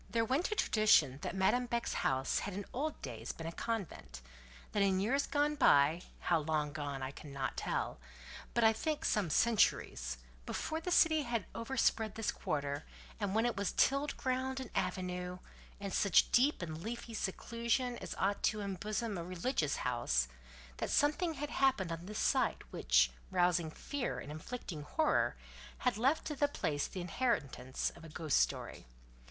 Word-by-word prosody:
There 225 +2 +1
went 275 - 0
a - - +1
tradition 160 - +4
that - - -4
Madame 245 +6 +2
Beck's 235 0 -1
house 130 0 +1
had 200 -2 -4
in 200 0 -4
old 300 +4 -2
days 115 -3 -5
been 165 - -8
a 165 - -3
convent. 200 - -4 0.5
That 205 - +1
in 190 -1 +3
years 260 +8 +1
gone 295 0 +2
by—how 165 - +3
long 150 -1 -1
gone 140 -2 -4
by - - -1
I 130 - -5
cannot 140 -2 -5
tell, - - -2 0.6
but 235 - +3
I 225 0 +6
think 305 +7 -2
some 205 -6 +1
centuries—before - - 0
the 360 - -3
city 320 -3 +5
had 235 -7 -2
over 265 +4 -4
spread 220 -3 +2
this 225 0 0
quarter, 145 0 -2 0.4
and 205 -1 -1
when 225 +2 +3
it 240 - +1
was 200 -1 -1
tilled 275 +2 +2
ground 260 0 -1
and 260 - -7
avenue, 180 -1 -2 0.4
and 200 -2 -4
such 200 - +4
deep 260 - +4
and 160 -1 -5
leafy 230 +3 -5
seclusion 235 +4 -1
as - - -6
ought 200 +1 0
to 215 - +2
embosom 205 +1 -2
a - - -4
religious 175 - -1
house—that 60 - -2
something 310 +3 +2
had 295 +1 -4
happened 260 -10 +2
on 165 +2 -5
this 210 - -5
site - - +2
which, 65 0 +3 0.2
rousing 175 -2 +2
fear 265 - -3
and 145 - -7
inflicting 160 0 -6
horror, 310 - +1 0.4
had 250 -3 +1
left 265 +8 +2
to 300 - -3
the 290 +1 +3
place 145 - -1
the 185 - -6
inheritance 165 - -1
of 170 - -13
a 165 - -9
ghost 155 -1 0
story. - - -1
195 Hz, 170 wpm, -34 LUFS, 150-245 Hz, 0.6 s, I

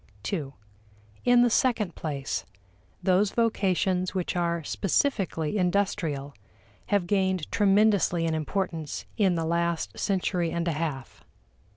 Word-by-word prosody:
(ii) 155 -8 -1 0.8
In 245 0 +6
the 245 - +4
second 225 -8 +1
place, 145 -4 -3 0.6
those 190 +2 +3
vocations 190 -5 +1
which 185 -1 -2
are 170 -1 0
specifically 195 - 0
industrial 170 -7 0 0.5
have 200 -3 +1
gained 190 -3 0
tremendously 200 -4 +3
in 165 - 0
importance 160 -1 -3
in 195 -5 +3
the 165 -1 -1
last 170 -10 -1
century 180 - 0
and 170 +1 -2
a - - +2
half. 150 -5 -4
180 Hz, 115 wpm, -27 LUFS, 165-200 Hz, 0.8 s, In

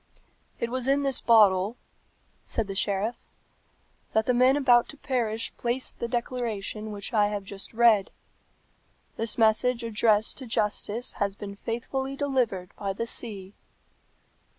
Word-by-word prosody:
"It 235 - -2
was 255 0 -2
in 280 +1 +2
this 275 -2 +1
bottle," 210 -1 +4 0.6
said 225 - -2
the 195 - -5
sheriff, 205 +3 -1 0.9
"that 220 0 +2
the 250 - +2
men 255 +3 +4
about 245 -4 +4
to 295 - -7
perish 230 -5 -2
placed 245 +2 -1
the 235 - -2
declaration 235 -3 -3
which 205 +4 -6
I 210 -2 +4
have 205 -1 -3
just 195 0 -5
read. 225 -4 +4 1.1
This 225 -1 -1
message 230 +2 +3
addressed 220 0 +2
to 260 - -8
justice 220 +2 0
has 200 -1 0
been 200 -1 -7
faithfully 265 +5 -4
delivered 250 -10 -1
by 195 -1 -2
the 230 +4 -3
sea." 205 -5 -4
230 Hz, 140 wpm, -27 LUFS, 205-250 Hz, 1.1 s, bottle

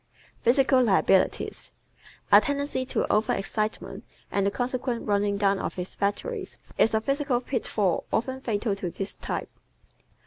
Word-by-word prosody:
Physical 260 +2 +4
Liabilities 195 -4 +2 0.6
¶ - - +12
A - - +9
tendency 285 -2 -1
to - - 0
over 215 - +2
excitement 215 +2 -3 0.3
and 200 -1 +1
the - - +4
consequent 245 +1 -2
running 205 -1 +1
down 200 -1 +2
of - - -3
his 180 0 -4
batteries 385 - -2 0.2
is 225 - +3
a 220 - +2
physical 275 0 0
pitfall 215 -7 -1
often 260 +3 -1
fatal 215 -3 -1
to 185 -3 -3
this 195 +3 -4
type. - - -4
220 Hz, 145 wpm, -26 LUFS, 200-260 Hz, 0.6 s, ¶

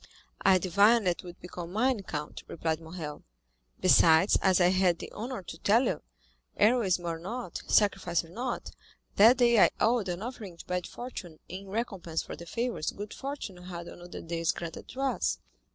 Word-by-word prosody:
"I 190 -1 +6
divined 200 +5 +4
that 175 -1 +1
you - - -12
would 175 - -10
become 175 -1 -7
mine, 235 +2 +1
count," 150 -5 -6
replied 160 -1 -2
Morrel; 160 -2 -7 0.6
"besides, 165 0 +6
as 190 -2 +4
I 175 -1 +5
had 185 -2 +3
the - - -8
honor 235 -1 -5
to 165 - -9
tell 225 +8 +4
you, - - -1 0.6
heroism 205 -6 +3
or 165 -1 -2
not, 205 +1 -5
sacrifice 190 -5 +2
or - - -16
not, 240 +7 -4 0.5
that 230 +5 +8
day 235 -3 +5
I - - +7
owed 225 -3 +2
an 180 +3 -3
offering 220 -8 -7
to - - -11
bad 180 -1 -2
fortune 195 -10 -8
in 190 +2 -8
recompense 195 -6 -3
for - - -7
the 170 - -11
favors 230 -6 -2
good 205 +1 -7
fortune 270 -9 -6
had 175 -1 -8
on - - -11
other 175 0 -8
days 165 0 -1
granted 170 -1 -7
to 260 - -7
us." 270 -3 0
185 Hz, 185 wpm, -29 LUFS, 170-230 Hz, 0.6 s, that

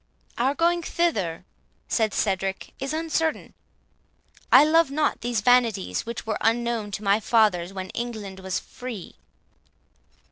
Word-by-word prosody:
"Our 265 +4 +2
going 345 +2 +2
thither," 220 - -1 0.4
said 220 -3 0
Cedric, 195 -1 -1
"is 270 +1 -3
uncertain. 320 0 -1 1.0
I 265 - +9
love 325 0 +4
not 300 +2 0
these 240 -2 -1
vanities, 230 -4 +2
which 235 0 -5
were 220 -1 -2
unknown 230 -2 0
to 210 - -4
my 200 +1 +3
fathers 205 -6 +2
when 190 -1 -6
England 215 -5 -5
was 190 -1 -3
free." 245 -7 -9
230 Hz, 130 wpm, -25 LUFS, 200-275 Hz, 1.0 s, I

